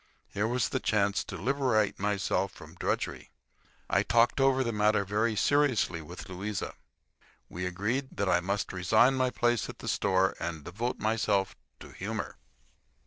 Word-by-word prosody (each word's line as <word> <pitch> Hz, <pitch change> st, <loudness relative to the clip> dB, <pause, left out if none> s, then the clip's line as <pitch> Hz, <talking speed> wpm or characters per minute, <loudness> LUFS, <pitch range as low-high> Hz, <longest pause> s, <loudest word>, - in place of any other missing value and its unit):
Here 105 Hz, +2 st, 0 dB
was 120 Hz, -1 st, 0 dB
the -, -, -1 dB
chance 100 Hz, -2 st, +1 dB
to 95 Hz, -, -6 dB
liberate 120 Hz, -, +1 dB
myself 100 Hz, -1 st, 0 dB
from -, -, -13 dB
drudgery. -, -, -3 dB, 0.6 s
I -, -, +3 dB
talked 120 Hz, +3 st, +3 dB
over 135 Hz, -1 st, +4 dB
the 115 Hz, -, -1 dB
matter 105 Hz, -1 st, +2 dB
very 110 Hz, +3 st, 0 dB
seriously 130 Hz, -, +2 dB
with 85 Hz, +4 st, -9 dB
Louisa. 95 Hz, +2 st, -4 dB, 0.8 s
We 90 Hz, +1 st, -4 dB
agreed 110 Hz, +9 st, -2 dB
that 100 Hz, -, 0 dB
I 90 Hz, -, +4 dB
must 100 Hz, +3 st, -2 dB
resign 110 Hz, +8 st, +4 dB
my 130 Hz, -1 st, +1 dB
place 120 Hz, -2 st, 0 dB
at -, -, -8 dB
the -, -, -9 dB
store 95 Hz, -1 st, +2 dB
and 85 Hz, -3 st, -4 dB
devote 115 Hz, -, -3 dB
myself 105 Hz, -3 st, 0 dB, 0.3 s
to -, -, -10 dB
humor. -, -, -5 dB
105 Hz, 155 wpm, -29 LUFS, 95-120 Hz, 0.8 s, over